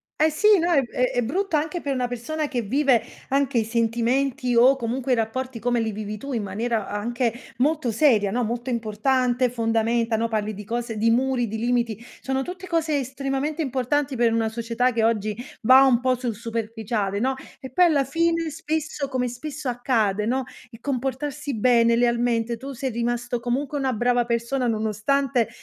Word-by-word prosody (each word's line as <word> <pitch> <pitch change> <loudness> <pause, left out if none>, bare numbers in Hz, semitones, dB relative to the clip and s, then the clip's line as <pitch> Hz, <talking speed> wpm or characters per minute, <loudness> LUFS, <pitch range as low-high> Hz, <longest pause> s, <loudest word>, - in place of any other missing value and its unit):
eh, 310 +1 +3
sì, 415 +6 +4
no, 345 +1 +1
è 275 -5 +4
è 245 0 0
brutto 360 - -1
anche 320 +3 -2
per 280 -1 -2
una 250 -1 -1
persona, 290 +6 -3
che 245 -4 -2
vive 260 +2 +2 0.3
anche 275 -2 +1
i 225 - +3
sentimenti, 240 +3 0
o 255 +4 +6
comunque 255 +1 -2
i - - +4
rapporti 235 +2 -2
come 240 +1 0
li 220 -1 -1
vivi 210 0 -5
tu, 275 +5 -6
in 225 -3 -1
maniera 215 +2 -2
anche 235 +3 -1 0.2
molto 285 -2 +1
seria, 220 -5 +3
no, 245 +3 0
molto 240 +3 -3
importante, 245 +2 +1
fondamenta, 230 0 0
no, 230 +1 0
parli 215 -1 -2
di 210 +1 -8
cose, 235 -1 -3
di 225 +2 +2
muri, 250 0 +1
di 220 +2 -4
limiti; 235 -2 0 0.2
sono 265 0 -1
tutte 370 +3 -7
cose 315 -4 +1
estremamente 275 +4 -2
importanti, 270 +1 -1
per 235 -1 +3
una 225 -1 +1
società 235 +2 0
che 225 -1 +1
oggi 215 -2 +1 0.3
va 260 +4 +8
un 250 -3 +4
po' 255 0 +2
sul 240 -3 -3
superficiale, 220 -3 -3
no, 265 +3 +1 0.3
e 260 - -9
poi 360 +6 +5
alla 295 -5 +3
fine 330 +2 0
spesso, 310 -2 -3
come 250 -1 -1
spesso 275 +3 -6
accade, 225 -5 0
no, 260 +2 0 0.3
il 230 -1 -13
comportarsi 275 +1 -3
bene, 235 -1 +4
lealmente, 235 -1 +1
tu 270 +3 -7
sei 260 +1 -3
rimasto 240 +1 -2
comunque 270 +4 -2
una 265 -2 0
brava 240 +1 +2
persona, 240 +2 -1
nonostante, 230 +3 0
245 Hz, 180 wpm, -24 LUFS, 230-275 Hz, 0.3 s, va